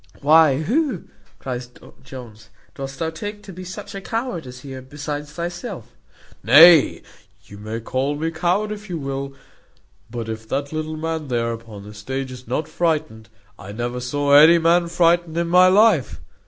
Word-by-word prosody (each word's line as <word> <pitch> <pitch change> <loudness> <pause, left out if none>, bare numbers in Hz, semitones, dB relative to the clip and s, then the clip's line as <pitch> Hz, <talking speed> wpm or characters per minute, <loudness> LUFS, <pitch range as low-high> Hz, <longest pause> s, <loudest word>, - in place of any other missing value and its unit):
"Why, 155 -1 +4
who," 260 - -1 0.3
cries 125 -2 -6 0.3
Jones, 120 -5 -12 0.2
"dost 135 -1 -7
thou 160 +1 -2
take 205 +5 -7
to 195 - -11
be 185 +2 -9
such 185 +3 -9
a 195 - -6
coward 225 - -4
here 130 +1 -9
besides 145 +2 -6
thyself?" 175 - -7 0.5
"Nay, 155 - +7 0.4
you 100 - -13
may 110 +2 -5
call 135 +5 -2
me 160 +2 -3
coward 180 +6 -1
if 210 -1 -8
you 175 - -3
will; 135 -1 -5 0.7
but 115 -1 -6
if 110 0 -7
that 140 +2 -3
little 155 0 -4
man 160 -1 -4
there 115 -2 -1
upon 115 -3 -10
the 105 +1 -11
stage 130 +5 -5
is 125 -1 -11
not 145 +6 -2
frightened, 155 - -2 0.3
I 100 +2 -9
never 120 +2 -4
saw 140 +3 -1
any 155 +4 +8
man 170 +1 +2
frightened 170 -1 +1
in 170 0 -1
my 180 +1 +6
life. 195 - +3
145 Hz, 165 wpm, -21 LUFS, 125-170 Hz, 0.7 s, any